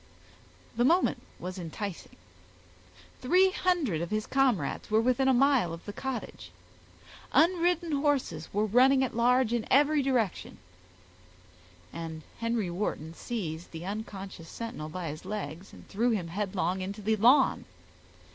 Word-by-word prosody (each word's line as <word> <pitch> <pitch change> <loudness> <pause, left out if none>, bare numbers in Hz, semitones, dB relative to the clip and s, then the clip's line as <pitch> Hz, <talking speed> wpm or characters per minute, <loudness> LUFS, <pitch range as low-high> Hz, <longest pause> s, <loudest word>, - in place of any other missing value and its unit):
The 240 - +3
moment 340 +8 +3 0.2
was 185 +1 -6
enticing. 180 +2 -6 1.1
Three 365 +9 +4
hundred 325 - 0
of 170 - -3
his 215 0 -1
comrades 265 -7 0
were 215 +1 +3
within 255 +3 +2
a - - +6
mile 260 - +3
of 165 - -9
the 205 - -6
cottage; 265 +2 -5 0.8
unridden 345 0 +3
horses 275 - 0
were 210 +2 +1
running 260 +5 +4
at 255 - -3
large 245 0 +3
in 235 -2 -1
every 290 +2 +4
direction, 245 -8 -1 1.4
and 160 -1 -6 0.2
Henry 230 -5 -1
Wharton 170 -4 -3
seized 170 -6 -5
the 165 +1 -8
unconscious 195 -4 -6
sentinel 225 -10 -6
by 170 0 -5
his 155 +1 -7
legs, 190 -3 -6
and - - -14
threw 230 +5 0
him 195 -8 -1
headlong 190 -1 -2
into 200 +3 -5
the 220 +2 +1
lawn. 250 +6 +4
215 Hz, 135 wpm, -29 LUFS, 180-265 Hz, 1.4 s, a